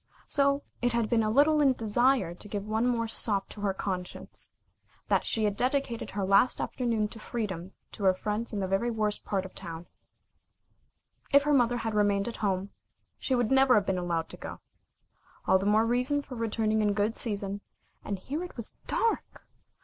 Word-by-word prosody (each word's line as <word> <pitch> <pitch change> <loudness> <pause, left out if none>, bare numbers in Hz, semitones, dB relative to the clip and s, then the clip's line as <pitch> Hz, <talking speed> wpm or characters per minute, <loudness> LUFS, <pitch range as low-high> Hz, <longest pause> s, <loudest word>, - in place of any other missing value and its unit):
So 280 0 +2 0.2
it 245 -1 +1
had 230 -2 0
been 230 -1 +4
a 215 - +1
little 295 +6 +4
in 280 - +5
a - - +3
desire 240 -2 +2
to 180 - -11
give 205 -1 -4
one 220 +3 +1
more 230 -2 +1
sop 205 -3 +1
to 205 - -10
her 200 -1 +1
conscience, 185 -2 -5 0.6
that - - +2
she 220 - +1
had 205 -1 +1
dedicated 255 -1 -1
her 195 -1 -2
last 200 +6 +4
afternoon 230 -4 -1
to 225 - -10
freedom 195 -6 -4 0.2
to 200 - -5
her 190 - +6
friends 210 +4 -2
in 205 -3 -2
the 190 - -1
very 195 +5 +1
worst 215 -2 -1
part 195 -2 -1
of 190 - -9
the - - -16
town. 170 -2 -7 1.5
If 280 0 +6
her 295 0 +2
mother 245 -3 +3
had 225 -2 -3
remained 205 -1 +2
at 235 - -5
home, 195 -1 -1 0.5
she 260 - 0
would 245 -2 +1
never 265 -1 +6
have 205 -2 +3
been 190 -2 0
allowed 170 -2 -2
to - - -10
go. - - -8 0.9
All 190 0 +4
the 195 - -1
more 215 +2 +4
reason 250 +5 +1
for 260 - -10
returning 220 -2 0
in 205 -1 +2
good 210 +2 0
season, 200 -3 -3 0.4
and 200 - -3
here 290 - -4
it 355 - -9
was 230 - -6
dark! 455 -1 -1
215 Hz, 200 wpm, -29 LUFS, 200-245 Hz, 1.5 s, her